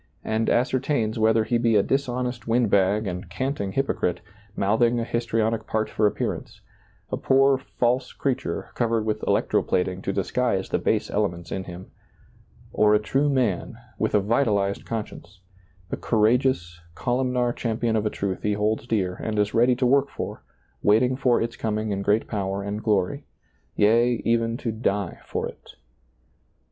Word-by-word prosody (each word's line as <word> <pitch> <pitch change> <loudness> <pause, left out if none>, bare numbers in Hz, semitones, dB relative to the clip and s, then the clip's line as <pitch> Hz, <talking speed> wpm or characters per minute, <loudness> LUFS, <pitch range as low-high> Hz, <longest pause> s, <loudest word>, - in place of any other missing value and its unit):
and 110 +1 0
ascertains 125 -2 +1
whether 110 0 +4
he 120 +2 0
be 115 -1 +2
a 100 - +5
dishonest 125 -3 -2
wind 115 -2 +2
bag 100 +2 +3
and 90 -2 -5
canting 100 -1 -3
hypocrite, 90 -10 0 0.4
mouth 105 +4 +1
ing 120 0 +3
a - - -1
histrionic 115 -1 -1
part 110 0 -1
for 105 - +2
appearance; - - -4 0.5
a - - -1
poor, 135 0 +3
false 125 0 -1
creature, 135 -2 -3
covered 115 -2 0
with 110 -1 -1
electro - - +2
plating 90 +1 -1
to 95 - -2
disguise 100 +1 -1
the - - 0
base - - 0
elements 85 -5 -2
in 95 -1 -3
him 90 +1 -10 0.4
— - - -28
or 105 0 +4
a - - +4
true 135 +7 +1
man 120 -5 0 0.2
with 110 - +1
a - - +6
vitalized 100 -2 +1
conscience, 105 -4 -6 0.5
the - - -2
courageous, 110 -6 +1 0.2
columnar 125 -1 0
champion 115 -1 -1
of 110 - +1
a 105 - +1
truth 100 -3 -3
he 105 - 0
holds 105 +3 -1
dear 95 -6 0
and 110 -1 -3
is 105 0 +1
ready 120 +2 +4
to 125 +1 0
work 140 +2 +3
for, - - -6 0.4
waiting 120 +5 +3
for 125 -2 +2
its 115 +1 -2
coming 110 -1 -2
in 100 0 -2
great 105 +3 +1
power 100 -2 -2
and 100 +2 -4
glory; 110 +7 0 0.3
— - - -41
yea, 115 +4 +4
even 115 0 +1
to 120 -3 -3
die 100 -4 -2
for - - -2
it. - - -13
110 Hz, 170 wpm, -24 LUFS, 100-125 Hz, 0.5 s, a